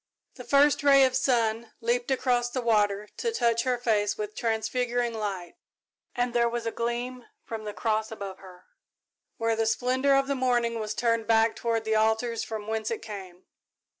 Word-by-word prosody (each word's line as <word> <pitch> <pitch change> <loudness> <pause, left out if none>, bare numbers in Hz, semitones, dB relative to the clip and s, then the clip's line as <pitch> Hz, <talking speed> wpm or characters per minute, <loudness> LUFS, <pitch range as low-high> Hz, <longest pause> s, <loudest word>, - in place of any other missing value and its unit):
The 250 - -10
first 285 +2 +4
ray 275 -1 +6
of 260 -1 +2
sun 230 -3 0
leaped 240 +2 -1
across 250 -2 +1
the 250 0 -3
water, 210 -2 +2
to 465 - -1
touch 235 - +1
her 250 -1 +1
face 215 -4 0
with 210 0 -5
transfiguring 235 +1 -1
light, 195 -6 -4 0.6
and 245 0 0
there 235 -1 +3
was 235 0 -4
a 230 - -1
gleam 240 +2 -3 0.2
from 220 -1 -6
the 210 - -5
cross 220 -1 -1
above 200 -3 -7
her, 185 -2 -14 0.7
where 230 -2 +1
the 225 0 0
splendour 260 +4 +2
of 275 0 +3
the 280 - -1
morning 240 -3 0
was 215 0 -3
turned 230 -2 0
back 225 0 +3
toward 230 -1 -1
the 220 - 0
altars 220 +2 +1
from 215 -2 -5
whence 220 0 -2
it 230 - -4
came. 190 -4 -9
230 Hz, 180 wpm, -27 LUFS, 220-245 Hz, 0.7 s, ray